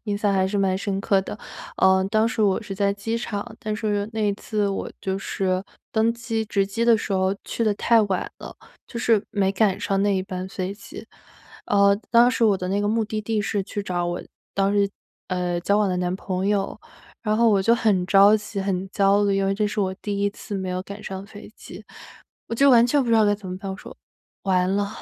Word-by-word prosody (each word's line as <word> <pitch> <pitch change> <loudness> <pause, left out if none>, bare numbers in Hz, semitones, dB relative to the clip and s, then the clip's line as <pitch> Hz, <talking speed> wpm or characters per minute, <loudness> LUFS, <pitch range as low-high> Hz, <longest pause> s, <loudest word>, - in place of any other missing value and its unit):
印 205 -2 -1
象 205 -1 +1
还 190 -1 +2
是 200 +2 -1
蛮 190 -1 +2
深 195 0 -2
刻 195 -1 +2
的。 210 - -7 0.4
呃， 190 0 +4
当 220 +1 +3
时 225 - -1
我 200 +1 +2
是 205 -2 -6
在 200 0 +1
机 225 +3 -3
场， 220 0 -5
但 215 0 -3
是 210 -1 -1
那 220 - -3
一 205 -1 +2
次 210 0 -2
我 195 - -3
就 190 0 -2
是 185 -1 -1 0.3
登 225 +1 +2
机 230 -1 -3
值 200 -2 0
机 230 +4 -2
的 230 -2 +5
时 205 - -4
候 190 +1 +1
去 230 - -2
得 215 - +3
太 230 +2 +4
晚 195 -3 -2
了， - - -9 0.3
就 235 - -7
是 225 -3 +2
没 195 -2 +1
赶 195 0 +1
上 195 0 0
那 205 0 +2
一 190 - 0
班 185 -1 -5
飞 190 0 -4
机。 205 - -11 0.6
呃， 200 -1 +4
当 240 +1 +6
时 240 - +1
我 210 -3 +4
的 180 - -4
那 200 +2 0
个 205 - 0
目 225 +1 +1
的 215 0 -3
地 215 0 -1
是 205 0 -1
去 205 +2 -5
找 180 -2 -2
我 175 0 -3 0.3
当 195 0 +2
时， 200 -1 +3 0.4
呃， 180 -1 -1
交 200 +4 +2
往 210 -2 +2
的 180 - -1
男 180 0 -1
朋 190 -1 -3
友。 200 -1 -1 0.4
然 215 0 +1
后 230 0 +4
我 200 -2 +3
就 230 +5 +4
很 205 -6 +1
着 200 +2 +6
急、 210 -1 -5
很 190 -1 -2
焦 200 +1 +3
虑， 200 -1 +2
因 195 - +1
为 195 - +1
这 210 +1 0
是 210 0 -2
我 190 -1 0
第 200 +1 -4
1 200 - +2
次 205 0 -8
没 190 -1 -3
有 180 0 -2
赶 200 +2 -9
上 190 +1 -6
飞 205 0 -12
机。 - - -11 0.6
我 - - -4
就 275 +4 +5
完 240 -2 +6
全 280 +3 +2
不 245 - -4
知 230 - +4
道 220 - +5
该 205 - +3
怎 200 -2 -9
么 180 0 -5
办， 195 - -6
我 - - -7
说：” - - -12 0.5
完 185 -1 +1
了， 200 0 0
200 Hz, 255 characters per minute, -23 LUFS, 190-215 Hz, 0.6 s, 当